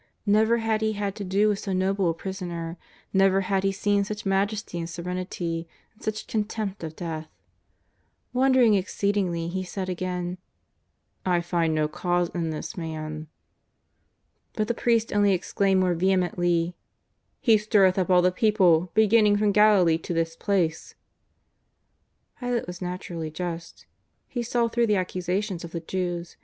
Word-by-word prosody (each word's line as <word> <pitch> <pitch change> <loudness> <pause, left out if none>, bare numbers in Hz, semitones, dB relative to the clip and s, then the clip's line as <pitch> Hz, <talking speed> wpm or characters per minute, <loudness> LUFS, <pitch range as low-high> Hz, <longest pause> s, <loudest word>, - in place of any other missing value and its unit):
Never 220 +3 +4
had 225 -1 0
he 220 0 +1
had 200 -1 -2
to 205 - -4
do 200 +3 +2
with 205 -2 +1
so 195 - -3
noble 190 0 +1
a - - +1
prisoner; 170 -2 -5 0.4
never 195 0 +4
had 195 0 0
he 195 - +2
seen 200 +1 +1
such 210 +1 -6
majesty 195 -1 -1
and 165 0 -4
serenity, 170 -1 -4 0.3
and 215 - -27
such 215 0 -3
contempt 210 -3 -3
of 160 -1 -6
death. 160 -3 -5 1.1
Wondering 255 -3 +4
exceedingly 190 -3 0
he 185 +2 -3
said 185 0 -5
again: 180 0 -3 0.9
'^ 185 - +1
I 175 - +3
find 170 -2 0
no 155 -1 +2
cause 175 +2 0
in 170 -2 -2
this 155 +8 -5
Man." 155 -2 -5 1.3
But 215 -1 -1
the 235 - +1
priests 230 -1 +1
only 205 -1 +3
exclaimed 190 +1 +1
more 180 -1 +2
vehemently: 175 -1 +1 0.3
" - - -50 0.3
He 225 -3 +4
stirreth 200 -3 +3
up 185 - 0
all 180 -1 +5
the 180 - +4
people, 185 -4 +3
beginning 215 -1 +5
from 210 0 +2
Galilee 200 -6 +5
to 170 - -4
this 165 0 -1
place." 170 -5 -1 1.4
Pilate 245 -2 -1
was 180 +1 -8
naturally 180 -3 -4
just. 165 +1 -6 0.4
He 245 - -3
saw 235 0 +1
through 235 0 +1
the 210 - +3
ac 185 -1 -2
cusations 180 +1 -2
of 170 - -6
the 170 - -4
Jews. 175 0 -4
185 Hz, 160 wpm, -26 LUFS, 175-210 Hz, 1.4 s, all